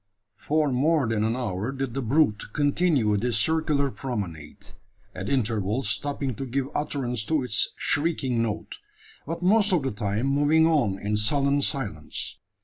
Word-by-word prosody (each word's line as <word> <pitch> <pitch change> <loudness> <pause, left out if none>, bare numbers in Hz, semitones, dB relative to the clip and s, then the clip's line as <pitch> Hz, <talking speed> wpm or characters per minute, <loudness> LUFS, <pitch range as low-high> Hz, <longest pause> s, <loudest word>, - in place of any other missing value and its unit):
For 150 -1 +1
more 145 +3 +2
than 110 -1 0
an 110 +2 0
hour 110 -2 -2
did 135 -3 -4
the 135 - -2
brute 120 -3 +2
continue 145 -7 +2
this 120 +1 0
circular 150 +1 +1
promenade, 100 - -6 0.4
at 95 +2 -5
intervals 115 -2 0
stopping 135 +5 -2
to 135 - -4
give 135 +2 -2
utterance 125 -6 -2
to 155 -4 +1
its 110 -4 +1
shrieking 145 -6 0
note; 110 -2 -4 0.5
but 165 +2 -4
most 205 +2 +4
of 175 -6 +2
the 135 - -1
time 105 +3 -2
moving 145 +3 +3
on 145 -12 +2
in 105 +2 -1
sullen 140 +6 +2
silence. 105 - -2
130 Hz, 150 wpm, -26 LUFS, 110-145 Hz, 0.5 s, most